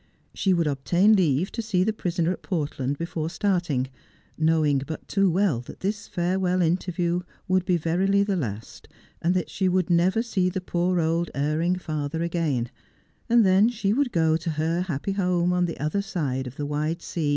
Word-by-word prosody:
She 195 Hz, -, +1 dB
would 170 Hz, -2 st, +2 dB
obtain 175 Hz, +9 st, +3 dB
leave 175 Hz, -1 st, +2 dB
to 230 Hz, -, -3 dB
see 200 Hz, -5 st, +1 dB
the 220 Hz, +3 st, 0 dB
prisoner 175 Hz, -4 st, -1 dB
at -, -, -5 dB
Port 155 Hz, -9 st, -3 dB
land 135 Hz, +2 st, -1 dB
before 165 Hz, -1 st, -3 dB
starting, 170 Hz, -7 st, 0 dB, 0.5 s
knowing 155 Hz, -3 st, +2 dB
but 155 Hz, -1 st, -6 dB
too 195 Hz, -1 st, +2 dB
well 180 Hz, -, +2 dB
that 125 Hz, -, -11 dB
this 205 Hz, +2 st, -2 dB
farewell 180 Hz, 0 st, 0 dB
interview 175 Hz, +1 st, 0 dB, 0.3 s
would 185 Hz, -1 st, +2 dB
be 180 Hz, -2 st, +2 dB
verily 190 Hz, +5 st, +2 dB
the 200 Hz, -1 st, 0 dB
last, 115 Hz, -, -5 dB, 0.3 s
and 175 Hz, +3 st, +1 dB
that 180 Hz, -, -1 dB
she 190 Hz, -1 st, +1 dB
would 180 Hz, -1 st, +1 dB
never 185 Hz, +6 st, +3 dB
see 190 Hz, -6 st, 0 dB
the 185 Hz, -, -3 dB
poor 180 Hz, 0 st, 0 dB
old 165 Hz, +1 st, 0 dB
erring 155 Hz, +5 st, +1 dB
father 155 Hz, -2 st, -3 dB
again; 155 Hz, -8 st, -1 dB, 0.6 s
and 235 Hz, -2 st, +5 dB
then 190 Hz, +4 st, +5 dB
she 210 Hz, -4 st, 0 dB
would 270 Hz, 0 st, +1 dB
go 160 Hz, -2 st, +2 dB
to 165 Hz, +1 st, -4 dB
her 160 Hz, +3 st, 0 dB
happy 180 Hz, 0 st, -3 dB
home 180 Hz, -2 st, +1 dB
on 180 Hz, 0 st, +2 dB
the 165 Hz, -, -5 dB
other 155 Hz, +8 st, 0 dB
side 140 Hz, -10 st, -2 dB
of 125 Hz, -, -9 dB
the 145 Hz, -, -4 dB
wide 150 Hz, +3 st, -1 dB
s^.. 160 Hz, -4 st, -2 dB
175 Hz, 190 wpm, -25 LUFS, 155-185 Hz, 0.6 s, and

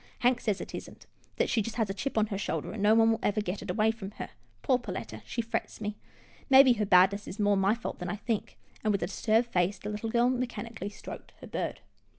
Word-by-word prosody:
Hank 245 Hz, 0 st, +3 dB
says 210 Hz, -3 st, 0 dB
it -, -, -7 dB
isn't, -, -, -8 dB, 0.3 s
that -, -, +1 dB
she 225 Hz, -, +1 dB
has 225 Hz, -2 st, +1 dB
a 195 Hz, -, -3 dB
chip 225 Hz, +6 st, -3 dB
on 215 Hz, -, +4 dB
her 205 Hz, -2 st, -4 dB
shoulder, -, -, -2 dB
and 220 Hz, -, -5 dB
no 210 Hz, +2 st, +5 dB
one 225 Hz, 0 st, +5 dB
will 225 Hz, -, 0 dB
ever 205 Hz, +1 st, +1 dB
get 200 Hz, -1 st, -3 dB
it 200 Hz, -, -8 dB
away 215 Hz, +4 st, +3 dB
from 220 Hz, -4 st, -7 dB
her. -, -, -5 dB, 0.3 s
Poor 255 Hz, -3 st, +3 dB
Perletta 245 Hz, -, -6 dB
— -, -, -29 dB
she 235 Hz, -, -2 dB
frets 230 Hz, -, -3 dB
me. 210 Hz, -1 st, -3 dB, 0.5 s
Maybe 265 Hz, -1 st, +8 dB
her 210 Hz, -3 st, -1 dB
badness 195 Hz, +2 st, +5 dB
is 200 Hz, -, -7 dB
more 205 Hz, -1 st, +4 dB
my 195 Hz, +2 st, +3 dB
fault 235 Hz, -, -6 dB
than 180 Hz, -1 st, -4 dB
I 210 Hz, -, -1 dB
think," 220 Hz, 0 st, -3 dB, 0.3 s
and, 215 Hz, -, +2 dB
with 200 Hz, -3 st, 0 dB
a -, -, +2 dB
disturbed 220 Hz, +5 st, +1 dB
face, 185 Hz, 0 st, +1 dB
the 205 Hz, -, -6 dB
little 210 Hz, +2 st, -3 dB
girl 240 Hz, +2 st, +3 dB
mechanically 235 Hz, -5 st, -4 dB
stroked 205 Hz, -, -10 dB
her -, -, -10 dB
bird. -, -, -3 dB
215 Hz, 245 wpm, -29 LUFS, 200-235 Hz, 0.5 s, Maybe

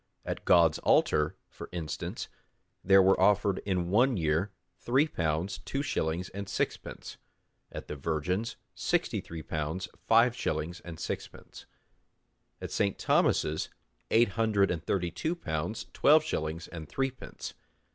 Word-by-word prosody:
At -, -, -4 dB
God's 85 Hz, -3 st, +5 dB
altar, 75 Hz, 0 st, +3 dB
for -, -, -10 dB
instance, 80 Hz, -3 st, -4 dB, 0.6 s
there 95 Hz, 0 st, +6 dB
were 95 Hz, 0 st, +4 dB
offered 100 Hz, 0 st, +3 dB
in 90 Hz, -2 st, 0 dB
one 120 Hz, +3 st, +4 dB
year 80 Hz, +4 st, +1 dB, 0.3 s
three 135 Hz, +6 st, +2 dB
pounds 85 Hz, -, -1 dB
two 135 Hz, +1 st, -3 dB
shillings 85 Hz, -, -1 dB
and 100 Hz, 0 st, -6 dB
sixpence; -, -, -3 dB, 0.5 s
at -, -, -7 dB
the -, -, -5 dB
Virgin's, 85 Hz, +9 st, -2 dB, 0.2 s
sixty -, -, 0 dB
three 80 Hz, -2 st, -8 dB
pounds 80 Hz, +6 st, -3 dB, 0.2 s
five 115 Hz, +2 st, +5 dB
shillings 85 Hz, +3 st, -2 dB
and 85 Hz, -2 st, -9 dB
sixpence; -, -, -7 dB, 0.9 s
at -, -, -6 dB
St. 100 Hz, -2 st, 0 dB
Thomas's, 80 Hz, +1 st, +2 dB, 0.4 s
eight 115 Hz, -1 st, +4 dB
hundred 105 Hz, -2 st, +2 dB
and 85 Hz, -2 st, -3 dB
thirty 90 Hz, -3 st, -1 dB
two 160 Hz, -, -2 dB
pounds 80 Hz, -, -3 dB
twelve 155 Hz, +2 st, +5 dB
shillings 80 Hz, -, -3 dB
and 80 Hz, -3 st, -8 dB
threepence. 135 Hz, -1 st, -4 dB
95 Hz, 135 wpm, -30 LUFS, 80-110 Hz, 0.9 s, there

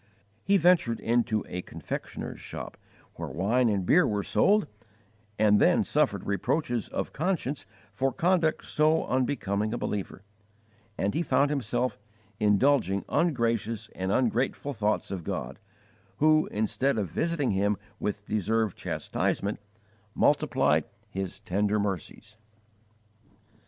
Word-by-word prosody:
He 200 Hz, +1 st, +4 dB
ventured 170 Hz, -10 st, +3 dB
into 115 Hz, -2 st, +1 dB
a 90 Hz, -, -4 dB
confectioner's -, -, -6 dB
shop -, -, -7 dB, 0.4 s
where -, -, -5 dB
wine 115 Hz, +8 st, +2 dB
and 100 Hz, -3 st, 0 dB
beer 180 Hz, -, +5 dB
were 105 Hz, -1 st, -1 dB
sold, 210 Hz, -, +3 dB, 0.7 s
and 105 Hz, -1 st, +4 dB
then -, -, +4 dB
suffered -, -, +1 dB
reproaches 120 Hz, +3 st, -1 dB
of -, -, -4 dB
conscience 150 Hz, -, -2 dB, 0.2 s
for 130 Hz, +7 st, 0 dB
conduct 170 Hz, +1 st, +1 dB
so 155 Hz, +1 st, +2 dB
unbecoming 110 Hz, -5 st, 0 dB
a -, -, -2 dB
believer; 100 Hz, -3 st, -4 dB, 0.7 s
and 100 Hz, -, 0 dB
he 165 Hz, -, 0 dB
found 140 Hz, -2 st, +2 dB
himself 125 Hz, -3 st, -1 dB, 0.4 s
indulging 105 Hz, -2 st, +3 dB
ungracious 115 Hz, -, 0 dB
and 95 Hz, +1 st, -2 dB
ungrateful 130 Hz, +4 st, 0 dB
thoughts 105 Hz, -2 st, -1 dB
of 95 Hz, -3 st, -4 dB
God, -, -, -4 dB, 0.6 s
who, 155 Hz, +1 st, +4 dB
instead 115 Hz, +5 st, 0 dB
of 100 Hz, -7 st, -2 dB
visiting 165 Hz, -7 st, 0 dB
him 100 Hz, +1 st, +1 dB, 0.2 s
with 105 Hz, 0 st, -3 dB
deserved 110 Hz, 0 st, 0 dB
chastisement, 100 Hz, +1 st, -2 dB, 0.6 s
multiplied 75 Hz, 0 st, +3 dB, 0.3 s
His 95 Hz, -1 st, -4 dB
tender 105 Hz, +1 st, 0 dB
mercies. 105 Hz, +2 st, -4 dB
110 Hz, 120 wpm, -28 LUFS, 100-140 Hz, 0.7 s, beer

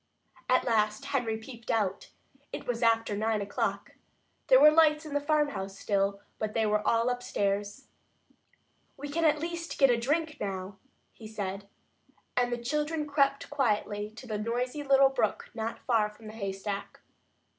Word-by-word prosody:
At 255 Hz, -, +4 dB
last 215 Hz, +1 st, +1 dB
Henry 245 Hz, -6 st, -1 dB
peeped 230 Hz, +1 st, -11 dB
out. 200 Hz, -4 st, 0 dB, 0.4 s
It -, -, -6 dB
was 240 Hz, -1 st, -2 dB
after 225 Hz, -2 st, +2 dB
nine 220 Hz, +1 st, 0 dB
o'clock. 200 Hz, 0 st, -2 dB, 0.6 s
There -, -, +7 dB
were 300 Hz, -, +9 dB
lights 310 Hz, -1 st, +4 dB
in 300 Hz, -, -7 dB
the 290 Hz, -, +1 dB
farmhouse 290 Hz, -10 st, 0 dB
still, 200 Hz, -1 st, 0 dB, 0.2 s
but 215 Hz, -1 st, -3 dB
they 225 Hz, -1 st, +2 dB
were 210 Hz, 0 st, +2 dB
all 230 Hz, +1 st, +3 dB
upstairs. 205 Hz, -1 st, -2 dB, 1.1 s
"We 290 Hz, +1 st, -6 dB
can 330 Hz, +3 st, 0 dB
at 305 Hz, -1 st, +4 dB
least 335 Hz, +1 st, -5 dB
get 275 Hz, -3 st, +6 dB
a 235 Hz, -, +2 dB
drink 305 Hz, +5 st, 0 dB
now," 195 Hz, -1 st, -4 dB, 0.4 s
he 220 Hz, -, -11 dB
said. 200 Hz, -2 st, -5 dB, 0.7 s
And 245 Hz, 0 st, +2 dB
the 240 Hz, -, 0 dB
children 300 Hz, +5 st, -1 dB
crept 280 Hz, -1 st, +1 dB
quietly 210 Hz, -6 st, 0 dB
to 255 Hz, -, -10 dB
the 215 Hz, -3 st, -3 dB
noisy 245 Hz, +6 st, -2 dB
little 275 Hz, -1 st, +5 dB
brook 240 Hz, -6 st, -1 dB
not 225 Hz, 0 st, -3 dB
far 225 Hz, -4 st, +2 dB
from 210 Hz, +1 st, -16 dB
the 215 Hz, -, -8 dB
haystack. 200 Hz, -1 st, -5 dB
230 Hz, 160 wpm, -29 LUFS, 210-285 Hz, 1.1 s, were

